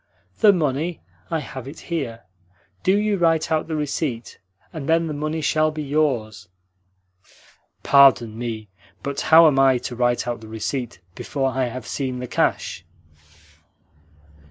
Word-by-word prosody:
"The 215 -2 +7
money? 160 -1 -1 0.3
I 160 - -1
have 135 -3 -8
it 145 +4 -10
here. 140 -10 -4 0.6
Do 190 +2 +3
you 210 -1 +1
write 165 -1 +2
out 155 -1 0
the 160 - -3
receipt, 140 -5 -3 0.3
and 155 -2 -6
then 165 +1 +3
the 155 - -4
money 155 +2 -3
shall 155 +1 +2
be 155 0 -5
yours." 135 -10 -1 1.3
"Pardon 135 -5 +5
me, 115 -2 -5 0.4
but 140 0 -3
how 160 +1 +7
am 145 -4 +4
I 135 -1 +5
to 125 0 -6
write 120 0 0
out 120 -1 -3
the 110 - -11
receipt 115 +1 -4
before 135 +6 -2
I 130 0 0
have 125 0 -6
seen 130 -1 -3
the 125 - -5
cash?" 90 - -1
140 Hz, 150 wpm, -22 LUFS, 120-155 Hz, 1.3 s, The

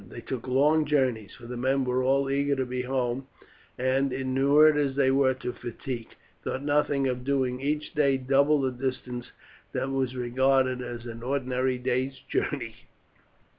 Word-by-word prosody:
They 120 - -8
took 130 +1 -5
long 150 +5 +3
journeys, 130 -8 0
for 120 - -13
the 125 +1 -6
men 130 +2 +1
were 125 0 +1
all 135 +1 +2
eager 140 +1 +1
to 130 -1 -1
be 125 0 -3
home, 130 0 -2 0.5
and, 130 +2 +1
inured 135 +4 +4
as 140 -2 0
they 135 -1 +3
were 135 -1 +3
to 125 -1 -5
fatigue, 120 0 -6 0.3
thought 130 - -3
nothing 145 -1 +1
of 125 -1 -1
doing 130 -2 0
each 150 +2 -2
day 140 -3 +3
double 140 +3 +3
the 130 -1 0
distance 125 -1 -4 0.4
that 135 - -2
was 130 -1 -1
regarded 130 +1 +2
as 120 -1 -6
an 115 -1 -7
ordinary 130 0 -1
day's 130 +1 -1
journey. - - -3
130 Hz, 165 wpm, -27 LUFS, 125-140 Hz, 0.5 s, inured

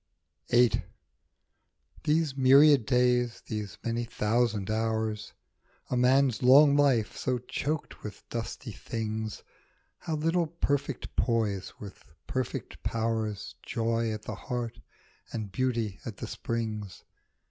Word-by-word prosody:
ii 120 +1 +7
VIII. - - -2 1.2
THESE 155 -2 +2
myriad 135 -1 +6
days, 125 -2 +2
these 105 -4 -5
many 115 0 -1
thou 120 +3 +3
sand 105 -2 -4
hours, 110 -1 -1 0.6
A - - +2
man's 125 -1 +3
long 140 +3 +7
life, 135 -7 +3
so 130 -1 -1
choked 145 +5 -4
with 105 -1 -9
dusty 120 +1 -5
things, 110 0 -4 0.6
How 160 - -3
little 165 +2 +1
perfect 145 -4 -2
poise 110 -5 0
with 100 -3 -10 0.2
perfect 130 -1 -4
powers, 110 -2 -2
Joy 115 0 -1
at 110 0 -5
the - - -5
heart 120 -3 -4 0.5
and 110 -4 -4
Beauty 115 -4 -1
at 110 -4 -7
the - - -5
springs. 110 -4 -4
115 Hz, 120 wpm, -29 LUFS, 110-130 Hz, 1.2 s, ii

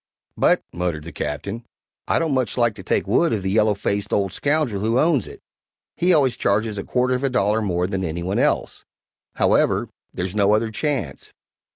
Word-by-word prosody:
"But," - - +3
muttered 85 -3 -2
the 85 - -8
Captain, 100 +11 -4 0.4
"I - - +2
don't 160 -3 0
much 130 -4 -1
like 120 -2 +2
to 95 - -10
take - - 0
wood 140 - +2
of 105 -4 -2
the 95 - -1
yellow 105 0 +3
faced 100 +1 -2
old 100 -2 0
scoundrel 140 -8 0
who 115 +3 +1
owns 150 -4 +2
it - - -12 0.5
he 180 +2 +2
always 140 -7 +3
charges 105 +1 0
a - - -4
quarter 125 0 0
of 125 +2 -2
a 135 - +2
dollar 110 -3 +1
more 90 -4 0
than 95 0 -2
any 85 0 -3
one 95 +3 -1
else; - - 0 0.5
however, - - +2 0.2
there's 90 +1 -4
no 105 0 +3
other 110 +1 -1
chance." 120 - -3
105 Hz, 195 wpm, -22 LUFS, 95-125 Hz, 0.5 s, But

